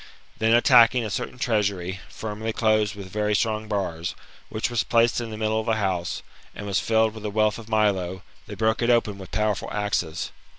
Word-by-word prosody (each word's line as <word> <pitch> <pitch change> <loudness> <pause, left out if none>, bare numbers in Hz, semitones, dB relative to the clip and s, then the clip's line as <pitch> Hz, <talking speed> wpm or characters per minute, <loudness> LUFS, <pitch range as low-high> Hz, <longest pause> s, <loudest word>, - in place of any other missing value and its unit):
Then 110 +1 +3
attacking 120 -1 +6
a 105 - -4
certain 125 +2 -4
treaaiury, 100 -6 -1
firmly 110 +1 -4
closed 110 -2 +2
with 95 -2 -9
very 105 0 0
strong 110 0 0
bars, 90 -5 -2 0.3
which 110 +2 -2
was 120 -3 +1
placed 115 0 +2
in 115 - -5
the 110 - -6
middle 110 0 0
of 110 - -5
the 115 - +3
house, 95 -5 -2 0.3
and 105 - -7
was 100 -2 0
filled 110 -1 +2
with 110 - -9
the 105 - -3
wealth 110 +1 +1
of 115 -1 -11
Milo, 95 -4 +1 0.2
they 105 - -7
broke 110 +2 +1
it 120 - +1
open 110 -4 +2
with 95 - -9
powerful 105 -2 -1
axes. 95 -6 -2
110 Hz, 200 wpm, -25 LUFS, 100-110 Hz, 0.3 s, attacking